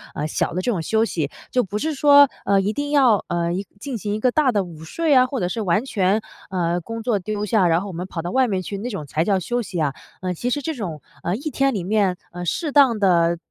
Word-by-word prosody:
呃， 150 Hz, -, -2 dB
小 -, -, -1 dB
的 180 Hz, -, -1 dB
这 240 Hz, -, 0 dB
种 180 Hz, -7 st, -1 dB
休 220 Hz, +7 st, +1 dB
息。 160 Hz, -9 st, -2 dB, 0.2 s
就 250 Hz, -, +2 dB
不 200 Hz, +2 st, -4 dB
是 310 Hz, +8 st, -1 dB
说， 285 Hz, 0 st, +6 dB, 0.2 s
呃， 200 Hz, -1 st, +3 dB
一 205 Hz, +2 st, -1 dB
定 290 Hz, +2 st, -3 dB
要， 255 Hz, -8 st, +4 dB
呃， 170 Hz, -1 st, -1 dB
一 195 Hz, +3 st, -3 dB
进 260 Hz, +2 st, -4 dB
行 205 Hz, 0 st, -3 dB
一 -, -, -3 dB
个 250 Hz, +2 st, +2 dB
大 290 Hz, -3 st, +3 dB
的 205 Hz, -4 st, +1 dB
午 165 Hz, -3 st, -11 dB
睡 315 Hz, -, 0 dB
啊， 255 Hz, -1 st, +6 dB
或 255 Hz, 0 st, -3 dB
者 180 Hz, -, 0 dB
是 225 Hz, -, -3 dB
完 200 Hz, +4 st, +1 dB
全， 205 Hz, -3 st, +1 dB, 0.3 s
呃， 175 Hz, -2 st, 0 dB
工 230 Hz, +6 st, -6 dB
作 220 Hz, -3 st, +1 dB
丢 210 Hz, +2 st, -3 dB
下， 210 Hz, -4 st, +3 dB
然 170 Hz, +1 st, +2 dB
后 200 Hz, -, -6 dB
我 190 Hz, -, -7 dB
们 180 Hz, +3 st, -5 dB
跑 170 Hz, -, -5 dB
到 175 Hz, +2 st, -4 dB
外 260 Hz, -1 st, +3 dB
面 190 Hz, -4 st, -1 dB
去， 200 Hz, +2 st, -5 dB
那 225 Hz, +5 st, -4 dB
种 195 Hz, -10 st, -5 dB
才 155 Hz, +3 st, -1 dB
叫 195 Hz, +1 st, +1 dB
休 240 Hz, +7 st, -2 dB
息 190 Hz, -6 st, -5 dB
啊。 140 Hz, -2 st, 0 dB, 0.3 s
呃， 185 Hz, -1 st, -2 dB
其 240 Hz, +8 st, -3 dB
实 290 Hz, -, -1 dB
这 320 Hz, +3 st, -3 dB
种， 170 Hz, -, -5 dB, 0.2 s
呃， 175 Hz, -, 0 dB
一 285 Hz, +7 st, -4 dB
天 275 Hz, -1 st, +1 dB
里 195 Hz, -5 st, -2 dB
面， 195 Hz, -1 st, +1 dB
呃， 175 Hz, 0 st, -6 dB
适 305 Hz, -, -1 dB
当 270 Hz, -5 st, +5 dB
的 170 Hz, -3 st, +3 dB
205 Hz, 295 characters per minute, -22 LUFS, 175-250 Hz, 0.3 s, 说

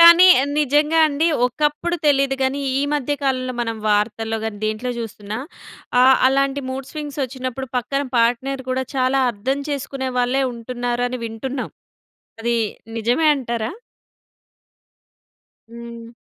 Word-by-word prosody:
కానీ 340 Hz, +2 st, +10 dB, 0.3 s
నిజంగా 300 Hz, +2 st, +3 dB
అండి. 300 Hz, +2 st, +1 dB, 0.2 s
ఒకప్పుడు 295 Hz, +6 st, 0 dB
తెలీదు 275 Hz, -1 st, +3 dB
గానీ 265 Hz, +2 st, 0 dB, 0.2 s
ఈ -, -, +1 dB
మధ్య 290 Hz, 0 st, -1 dB
కాలంలో 255 Hz, -2 st, 0 dB
మనం 230 Hz, -1 st, -2 dB
వార్తల్లో 220 Hz, +2 st, 0 dB
గానీ, 220 Hz, -2 st, -3 dB
దేంట్లో 215 Hz, +3 st, -2 dB
జూస్తున్నా 215 Hz, -1 st, -5 dB, 0.6 s
ఆహ్, 260 Hz, +1 st, +7 dB
అలాంటి 275 Hz, +1 st, +2 dB
మూడ్ 265 Hz, 0 st, -5 dB
స్వింగ్స్ 295 Hz, -2 st, -6 dB
వచ్చినప్పుడు 260 Hz, 0 st, -4 dB
పక్కన 260 Hz, +3 st, -1 dB
పార్ట్‌నర్ 245 Hz, +3 st, +1 dB
కూడా 260 Hz, 0 st, 0 dB
చాలా 260 Hz, +1 st, +2 dB
అర్థం 260 Hz, +6 st, -2 dB
చేసుకునే 270 Hz, -2 st, -3 dB
వాళ్ళే 250 Hz, +2 st, +2 dB
ఉంటున్నారు 240 Hz, +1 st, -3 dB
అని 255 Hz, -, -4 dB
వింటున్నాం. 250 Hz, +4 st, -4 dB, 0.7 s
అది 235 Hz, +1 st, 0 dB, 0.4 s
నిజమే 245 Hz, +8 st, +2 dB
అంటారా? 235 Hz, -3 st, -3 dB, 2.0 s
హ్మ్. 235 Hz, 0 st, -10 dB
255 Hz, 120 wpm, -21 LUFS, 235-275 Hz, 2.0 s, కానీ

